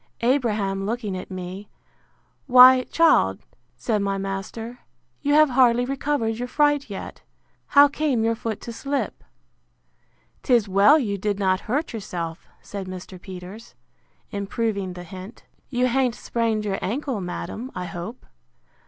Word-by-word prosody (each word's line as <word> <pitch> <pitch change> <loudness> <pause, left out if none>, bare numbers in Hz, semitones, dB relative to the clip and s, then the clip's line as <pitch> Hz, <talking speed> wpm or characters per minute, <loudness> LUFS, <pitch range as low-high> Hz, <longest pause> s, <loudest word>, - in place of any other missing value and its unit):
Abraham 215 -6 +1
looking 220 -4 -3
at 185 - -7
me; 185 +2 -7 0.8
Why, 255 0 +8
child, 95 - +3 0.4
said 210 - 0
my 195 0 -1
master, 195 +5 -5 0.4
you 290 +1 +2
have 305 -2 +6
hardly 245 -1 +4
recovered 270 -4 -1
your 245 - -3
fright 290 -1 +2
yet: 195 - -7 0.5
how 285 0 +7
came 285 -5 0
your 230 0 +2
foot 225 -1 -4
to 235 - -7
slip? 275 +4 -3 1.2
'Tis 240 -6 +3
well 200 +10 +6
you 205 -9 -2
did 205 +1 -1
not 190 -2 +1
hurt 290 +5 -1
yourself. 170 -6 -5 0.2
Said 200 -2 -6
Mr. 185 0 -9
Peters, 190 +4 -10 0.6
improving 200 -1 -2
the 180 0 -8
hint, 190 +4 -10 0.3
You 250 -1 +1
ha'n't 255 -1 +1
sprained 225 -2 -1
your 195 -2 -1
ancle, 255 0 -2
madam, 180 - -5
I 180 - -4
hope. 175 +8 -7
220 Hz, 135 wpm, -24 LUFS, 195-255 Hz, 1.2 s, Why